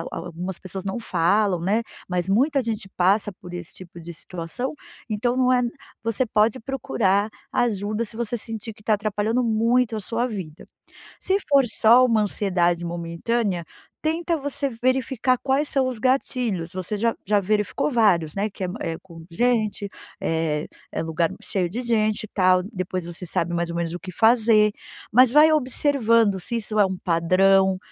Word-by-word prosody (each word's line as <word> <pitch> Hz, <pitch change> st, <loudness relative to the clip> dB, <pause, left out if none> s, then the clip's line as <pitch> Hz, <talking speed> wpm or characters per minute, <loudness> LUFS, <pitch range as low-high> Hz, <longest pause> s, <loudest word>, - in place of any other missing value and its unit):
a -, -, -7 dB
algumas 175 Hz, +2 st, -6 dB
pessoas 190 Hz, +1 st, -7 dB
não 195 Hz, +5 st, -3 dB
falam, 200 Hz, -2 st, +1 dB
né, 205 Hz, +6 st, +1 dB, 0.3 s
mas 180 Hz, -1 st, -1 dB
muita 270 Hz, +7 st, +2 dB
gente 220 Hz, -3 st, -3 dB
passa 195 Hz, +3 st, +2 dB
por 180 Hz, -1 st, -12 dB
esse 175 Hz, -2 st, -8 dB
tipo 175 Hz, -2 st, -12 dB
de 170 Hz, +1 st, -8 dB
situação. 175 Hz, +9 st, -5 dB, 0.4 s
Então 240 Hz, +4 st, 0 dB
não 255 Hz, 0 st, +3 dB
é 250 Hz, 0 st, +3 dB, 0.4 s
você 230 Hz, +3 st, 0 dB
pode 215 Hz, +2 st, +2 dB
procurar 225 Hz, -6 st, 0 dB, 0.2 s
ajuda 215 Hz, -1 st, 0 dB
se 220 Hz, 0 st, -10 dB
você 235 Hz, 0 st, -2 dB
sentir 225 Hz, 0 st, -5 dB
que 210 Hz, -, -20 dB
tá 215 Hz, +1 st, +2 dB
atrapalhando 215 Hz, +3 st, 0 dB
muito 230 Hz, +1 st, +2 dB
a 215 Hz, -, -2 dB
sua 230 Hz, +4 st, -1 dB
vida. 185 Hz, -9 st, -7 dB, 0.6 s
Se 380 Hz, -, 0 dB
for 275 Hz, -2 st, +5 dB
só 240 Hz, +3 st, +6 dB
uma 225 Hz, -3 st, +3 dB
ansiedade 175 Hz, -4 st, 0 dB
momentânea, 175 Hz, +3 st, -2 dB, 0.4 s
tenta 330 Hz, +1 st, 0 dB
você 280 Hz, 0 st, -3 dB
verificar 255 Hz, +1 st, 0 dB
quais 275 Hz, +2 st, +1 dB
são 265 Hz, -2 st, +1 dB
os 250 Hz, -3 st, -3 dB
gatilhos. 235 Hz, -8 st, 0 dB
Você 185 Hz, +3 st, -4 dB
já 230 Hz, 0 st, +1 dB
já 205 Hz, +1 st, +3 dB
verificou 210 Hz, +7 st, 0 dB
vários, 195 Hz, -, +2 dB
né. 205 Hz, +2 st, 0 dB
Que 190 Hz, -, -7 dB
é -, -, -2 dB
é 165 Hz, -1 st, -3 dB
com 165 Hz, -3 st, -13 dB
gente 215 Hz, -1 st, 0 dB, 0.3 s
é 160 Hz, -2 st, -1 dB, 0.2 s
é -, -, -2 dB
lugar 160 Hz, +1 st, 0 dB
cheio 185 Hz, -4 st, -1 dB
de 235 Hz, +8 st, -4 dB
gente 215 Hz, -3 st, +1 dB
e -, -, -13 dB
tal. 185 Hz, -2 st, +3 dB
Depois 185 Hz, -3 st, -4 dB
você 175 Hz, +1 st, -7 dB
sabe 170 Hz, 0 st, -1 dB
mais 170 Hz, 0 st, -1 dB
ou -, -, -5 dB
menos 170 Hz, -1 st, -2 dB
o 175 Hz, -, -5 dB
que 185 Hz, +2 st, -8 dB
fazer. 220 Hz, 0 st, +4 dB, 0.4 s
Mas 250 Hz, +1 st, +6 dB
vai 300 Hz, +3 st, +7 dB
observando 235 Hz, -7 st, +2 dB
se 235 Hz, +6 st, -3 dB
isso 215 Hz, -1 st, -2 dB
é 200 Hz, -, +6 dB
um 190 Hz, -1 st, -3 dB
padrão, 190 Hz, +3 st, +3 dB
210 Hz, 175 wpm, -23 LUFS, 180-240 Hz, 0.6 s, vai